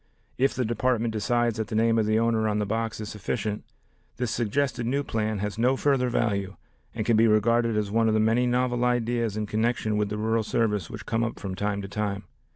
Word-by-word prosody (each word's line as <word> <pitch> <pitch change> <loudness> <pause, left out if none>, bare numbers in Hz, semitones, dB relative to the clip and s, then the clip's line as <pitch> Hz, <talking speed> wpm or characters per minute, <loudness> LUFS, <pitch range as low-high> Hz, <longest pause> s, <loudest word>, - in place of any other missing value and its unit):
If 135 +1 +2
the 125 -1 0
Department 120 0 0
decides 120 +1 0
that 110 -1 -2
the 115 - -4
name 115 +1 +3
of 110 - +1
the 110 0 +2
owner 115 -1 +2
on 105 -1 0
the 105 - 0
box 110 +2 -2
is 105 - -5
sufficient, 105 0 -3 0.5
this 125 -3 -1
suggested 120 +1 -1
new 140 +3 0
plan 110 -4 -2
has 105 +2 -4
no 125 +3 +3
further 135 -3 +2
value 100 -5 -1 0.4
and 110 -2 -2
can 115 - +3
be 115 +1 +5
regarded 115 +1 +3
as 105 -2 -1
one 115 +1 +2
of 110 - +2
the - - +3
many 115 +3 +2
novel 125 0 +1
ideas 120 -3 0
in 105 - -1
connection 110 0 0
with 105 -1 0
the 105 - -3
rural 110 +1 +1
service 105 -5 0
which - - -8
come 115 0 0
up 115 - -3
from 95 -2 -5
time 100 +1 -2
to - - -5
time. 100 -1 -3
110 Hz, 225 wpm, -26 LUFS, 105-120 Hz, 0.5 s, be